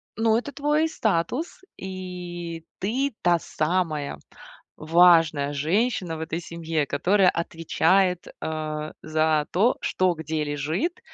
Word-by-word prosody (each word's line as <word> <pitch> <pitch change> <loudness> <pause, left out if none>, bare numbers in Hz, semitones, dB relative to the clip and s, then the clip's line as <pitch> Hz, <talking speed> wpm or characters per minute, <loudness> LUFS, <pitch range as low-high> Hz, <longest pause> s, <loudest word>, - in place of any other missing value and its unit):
ну, 225 0 +3
это 280 +4 -4
твой 300 +2 +1
статус, 225 - -1
и 175 -3 -6
ты 260 +8 -1
та 175 -1 +4
самая 155 - -1 0.6
важная 160 -3 +4
женщина 175 - 0
в - - -8
этой 160 +1 -3
семье, 165 -3 -2
которая 185 +7 +3
отвечает, 170 +2 +1
а, 155 -1 -3
за 155 -1 +1
то, 220 +8 +3
что 185 -1 +1
где 160 -1 -3
лежит 155 - -2
170 Hz, 115 wpm, -25 LUFS, 155-195 Hz, 0.6 s, та